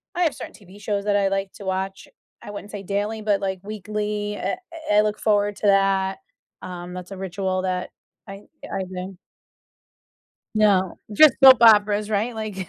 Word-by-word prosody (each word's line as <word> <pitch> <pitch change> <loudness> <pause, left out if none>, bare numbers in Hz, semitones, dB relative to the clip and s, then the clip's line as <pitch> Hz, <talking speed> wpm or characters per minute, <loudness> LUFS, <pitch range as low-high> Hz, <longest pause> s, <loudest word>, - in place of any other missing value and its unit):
I 355 - +1
have 315 - +1
certain - - -9
TV 200 -1 -16
shows 200 -1 -2
that 205 -1 +1
I 200 -1 +2
like 195 0 -2
to 200 - -9
watch, 190 +1 -3 0.3
I 205 - -9
wouldn't 205 0 -9
say 200 -1 -7
daily, 205 +3 -2
but 205 -2 0
like 190 -1 -2
weekly, 210 0 -4
I - - -2 0.4
I 210 - +6
look 210 0 -2
forward 205 -1 +1
to 210 - -1
that, 195 -1 +2 0.4
um, 180 0 -8
that's 180 +1 -8
a 195 - -7
ritual 190 0 -3
that 185 -1 -2 0.4
I 195 +1 -10 0.3
I 190 - -2
do. 185 0 -7 1.4
No, 195 -4 +2
just 290 +4 +7
soap 260 -3 +9
operas, 210 -1 +5
right? 220 +3 -1
Like. 205 -5 -5
200 Hz, 175 wpm, -23 LUFS, 190-210 Hz, 1.4 s, soap